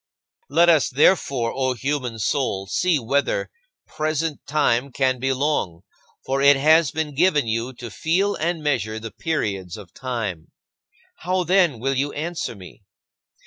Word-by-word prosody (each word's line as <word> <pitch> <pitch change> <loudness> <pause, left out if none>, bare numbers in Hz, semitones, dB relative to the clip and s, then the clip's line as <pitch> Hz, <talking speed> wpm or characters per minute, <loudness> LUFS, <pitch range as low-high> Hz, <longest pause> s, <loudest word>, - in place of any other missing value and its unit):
19. - - -7
Let 170 +1 +6
us, 160 -5 +4
therefore, 135 -4 +2
O 130 -1 0
human 130 -2 -3
soul, 110 -4 -1
see 175 - +1
whether 140 - -1 0.3
present 155 0 -2
time 140 -3 +1
can 130 0 0
be 135 +2 0
long, 130 - -1 0.4
for 135 +1 -1
it 140 +1 +7
has 155 +2 +4
been 155 +1 -3
given 150 -2 +3
you 115 +3 -2
to 120 -2 -9
feel 185 - 0
and 165 0 -2
measure 115 -7 -1
the 115 0 -7
periods 100 - -3
of 100 -5 -13
time. 115 -11 -4 0.7
How, 185 +1 -1
then, 175 -7 +2
will 135 +3 0
you 140 +2 -1
answer 160 -4 -4
me? 95 +1 -13
135 Hz, 150 wpm, -22 LUFS, 115-160 Hz, 0.7 s, it